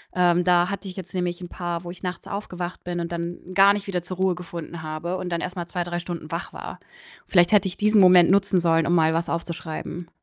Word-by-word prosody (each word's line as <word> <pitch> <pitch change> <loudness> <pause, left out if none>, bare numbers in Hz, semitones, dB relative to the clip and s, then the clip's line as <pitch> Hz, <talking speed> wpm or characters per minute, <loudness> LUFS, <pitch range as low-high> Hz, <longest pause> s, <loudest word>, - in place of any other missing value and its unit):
ähm, 180 -1 +3
da 175 0 +4
hatte 200 0 -5
ich 185 - -7
jetzt 190 -2 -8
nämlich 180 -1 -2
'n 175 - -7
paar, 175 -1 -4
wo 175 - -6
ich 180 - -13
nachts 180 -1 -5
aufgewacht 180 -3 -5
bin 175 -1 -3
und 170 0 -4
dann 170 0 -4
gar 195 +1 +7
nicht 205 0 -4
wieder 180 -3 -1
zur 185 0 -7
Ruhe 190 -1 +2
gefunden 170 -1 -7
habe 155 +4 -3
und 180 - -4
dann 170 0 -1
erst 180 +1 -4
mal 175 - -3
2, 180 -2 -2
3 175 0 -3
Stunden 170 -3 -6
wach 170 +1 -4
war. - - -8 0.5
Vielleicht 175 0 +4
hätte 205 -2 +5
ich 180 - -5
diesen 210 0 +4
Moment 180 -2 +7
nutzen 195 -1 +3
sollen, 165 -2 +3
um 170 - +2
mal 160 -1 +4
was 165 +1 -1
aufzuschreiben. 170 0 -5
175 Hz, 245 wpm, -24 LUFS, 170-185 Hz, 0.5 s, gar